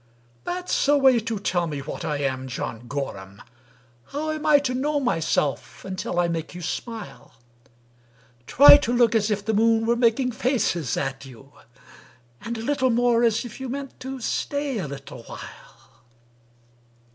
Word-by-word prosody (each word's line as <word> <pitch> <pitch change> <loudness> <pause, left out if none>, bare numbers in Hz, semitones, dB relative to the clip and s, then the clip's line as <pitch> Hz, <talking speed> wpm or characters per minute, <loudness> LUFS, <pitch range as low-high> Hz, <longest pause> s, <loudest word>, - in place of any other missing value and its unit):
"— 120 0 -35
"That's 360 -4 -1
a 290 0 +5
way 265 -3 +5
to 225 0 -3
tell 175 -3 -1
me 150 -2 -4
what - - -7
I 150 -1 -1
am, 130 -2 -2
John 120 -2 -5
Gorham! 100 -9 -6 0.7
How 310 +2 -3
am 310 0 -4
I 300 -1 +7
to 275 -3 -1
know 290 +3 0
myself 165 - -1
until 185 -2 -3
I 175 - +2
make 165 0 -4
you 180 - -7
smile? 225 +6 -6 1.1
Try 285 +2 +9
to 245 -5 -2
look 240 -2 +4
as 220 -1 +2
if 205 -1 -2
the 220 - 0
moon 225 +1 +3
were 235 +1 +2
making 245 +2 +2
faces 225 - 0
at 135 0 -3
you, 135 +2 -15 0.9
And 235 0 -5
a 225 - -6
little 260 0 +1
more 240 0 +3
as 230 +1 +2
if 240 - -9
you 265 -1 -5
meant 275 +1 -6
to 265 0 -6
stay 285 0 -2
a 175 - -3
little 135 -3 -9
while." - - -13
225 Hz, 170 wpm, -24 LUFS, 155-260 Hz, 1.1 s, Try